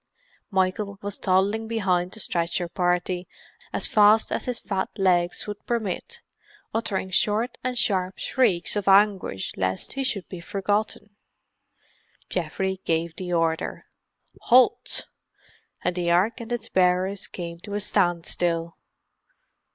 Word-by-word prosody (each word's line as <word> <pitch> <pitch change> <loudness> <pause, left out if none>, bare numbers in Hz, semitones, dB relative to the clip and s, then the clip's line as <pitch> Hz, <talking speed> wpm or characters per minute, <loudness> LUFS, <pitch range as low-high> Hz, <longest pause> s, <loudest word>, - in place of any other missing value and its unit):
Michael 200 +1 0
was 205 -1 -4
toddling 200 +4 +1
behind 185 -5 0
the 220 - -8
stretcher 170 -2 -1
party 180 0 0 0.4
as - - +1
fast 215 +1 +5
as - - -2
his 250 -2 -3
fat 190 -2 -2
legs 175 -3 +2
would 210 -1 -7
permit, 235 - -3 0.5
uttering 200 -4 -2
short 215 +6 +1
and 250 0 -2
sharp 190 -4 0
shrieks 215 -11 +1
of 205 -2 -2
anguish 195 - +3
lest 95 0 -2
he 270 - -2
should 200 -8 -2
be 180 - -7
forgotten. 205 +2 -2 1.2
Geoffrey 190 +2 -2
gave 165 0 -1
the 180 -1 -5
order, 165 -1 0 0.5
"Halt!" 250 +1 +3 0.8
and 180 - 0
the 175 -1 0
Ark 200 +8 +2
and 230 +1 -8
its 240 -2 -2
bearers 185 +2 +1
came 170 -1 -7
to 205 +3 -6
a - - 0
standstill. 175 -3 0
190 Hz, 130 wpm, -25 LUFS, 175-210 Hz, 1.2 s, fast